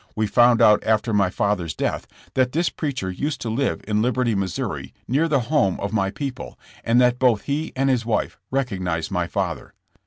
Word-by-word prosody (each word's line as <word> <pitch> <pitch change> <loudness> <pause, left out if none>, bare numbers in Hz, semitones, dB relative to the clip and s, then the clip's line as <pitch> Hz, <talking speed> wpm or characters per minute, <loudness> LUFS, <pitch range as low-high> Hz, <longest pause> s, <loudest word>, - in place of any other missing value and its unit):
We 110 - +1
found 120 +2 +4
out 105 -2 +5
after 110 +1 +1
my 100 -2 +3
father's 90 -4 -1
death - - -2 0.3
that 130 -1 +1
this 170 +3 +1
preacher 130 - -3
used 140 +9 -3
to 115 - -3
live 130 +4 -1
in 105 0 +1
Liberty, 125 0 +1
Mo., 100 -1 0 0.6
near 145 +7 +2
the 145 -5 +2
home 120 - +1
of 100 +2 -4
my 95 -3 +1
people, 135 +4 -6 0.3
and 115 +2 +3
that 125 0 +3
both 120 -5 +3
he 150 +3 -2
and 135 +1 +1
liis 125 -3 +2
wife 115 -1 -2
recognized 95 -11 -2
my 90 -3 -1
father. - - -3
115 Hz, 190 wpm, -22 LUFS, 100-130 Hz, 0.6 s, out